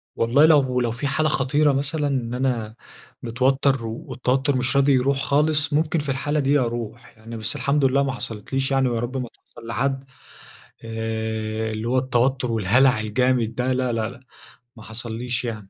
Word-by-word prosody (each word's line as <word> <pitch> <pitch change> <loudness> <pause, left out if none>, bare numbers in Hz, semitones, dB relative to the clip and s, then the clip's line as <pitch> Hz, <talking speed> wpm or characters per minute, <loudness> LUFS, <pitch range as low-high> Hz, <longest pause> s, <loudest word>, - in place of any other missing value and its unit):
والله 125 +6 +4
لو 135 -5 +3
لو 120 -2 0
في 125 +5 -3
حالة 155 +3 +1
خطيرة 145 +2 +2
مثلًا 145 +2 -1
إن 125 -4 -2
أنا 120 -4 -2 0.5
متوتر، 130 +1 +1
والتوتر 130 +4 -1
مش 125 +2 +1
راضي 140 0 +4
يروح 135 +2 +2
خالص، 150 +1 +1
ممكن 160 +2 +1
في 145 -1 -4
الحالة 145 +3 -1
دي 140 +1 +3
أروح. 120 -1 -5
يعني 115 +1 -9
بس 110 +5 -2
الحمد 140 +1 +1
لله 140 +1 +3
ما 135 - -1
حصلتليش 130 +3 -3
يعني، 135 -1 +2
ويا 115 -1 -1
رب 125 +3 -3
ما 125 -3 -4
تحصل 115 - -16
لحد. 135 +3 -1 0.8
آآ، 110 -1 -3
اللي 110 +2 -4
هو 130 +2 +1
التوتر 130 0 +1
والهلع 115 +3 +3
الجامد 115 +1 0
ده 130 +1 0
لا، 130 -1 0
لا، 110 0 -1
لا، 125 - -13 0.6
ما 110 - -11
حصلّيش 120 +2 -4
يعني. 105 -4 -6
125 Hz, 170 wpm, -23 LUFS, 115-135 Hz, 0.8 s, والله